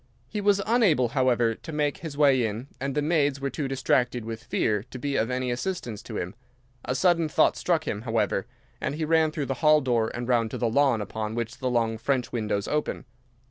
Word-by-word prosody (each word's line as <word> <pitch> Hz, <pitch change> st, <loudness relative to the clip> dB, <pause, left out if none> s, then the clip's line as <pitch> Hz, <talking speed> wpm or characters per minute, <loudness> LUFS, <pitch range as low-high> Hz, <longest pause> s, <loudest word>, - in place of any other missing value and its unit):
He 210 Hz, -, -4 dB
was 200 Hz, -1 st, +3 dB
unable, 200 Hz, -, +3 dB
however, 120 Hz, -3 st, +2 dB
to 160 Hz, -, -10 dB
make 150 Hz, -2 st, 0 dB
his 155 Hz, -4 st, -7 dB
way 140 Hz, -4 st, +4 dB
in, 115 Hz, +5 st, -3 dB
and 135 Hz, 0 st, -3 dB
the 150 Hz, -, +1 dB
maids 145 Hz, -3 st, +2 dB
were 140 Hz, 0 st, -2 dB
too 145 Hz, -3 st, -3 dB
distracted 125 Hz, -3 st, 0 dB
with 115 Hz, 0 st, -6 dB
fear 105 Hz, -2 st, 0 dB
to -, -, -7 dB
be 140 Hz, +2 st, -2 dB
of 115 Hz, -, +1 dB
any 125 Hz, 0 st, -1 dB
assistance 120 Hz, -, -3 dB
to 110 Hz, -1 st, -7 dB
him. 90 Hz, +2 st, -4 dB, 0.5 s
A 130 Hz, -, -2 dB
sudden 170 Hz, -1 st, +3 dB
thought -, -, +3 dB
struck 165 Hz, -3 st, 0 dB
him, 105 Hz, -, -2 dB
however, 115 Hz, -1 st, 0 dB, 0.3 s
and -, -, -2 dB
he 155 Hz, 0 st, -2 dB
ran 160 Hz, 0 st, +3 dB
through 155 Hz, -2 st, -3 dB
the 135 Hz, -, -1 dB
hall 155 Hz, 0 st, +6 dB
door 120 Hz, -5 st, +1 dB
and 120 Hz, 0 st, -4 dB
round 120 Hz, -3 st, +2 dB
to -, -, -5 dB
the 120 Hz, -, 0 dB
lawn 135 Hz, -3 st, +3 dB
upon 110 Hz, +1 st, -4 dB
which 120 Hz, +2 st, -4 dB
the 130 Hz, -2 st, -1 dB
long 115 Hz, -2 st, 0 dB
French 130 Hz, -3 st, 0 dB
windows 105 Hz, -4 st, -1 dB
open. 150 Hz, -2 st, -2 dB
130 Hz, 220 wpm, -26 LUFS, 115-150 Hz, 0.5 s, hall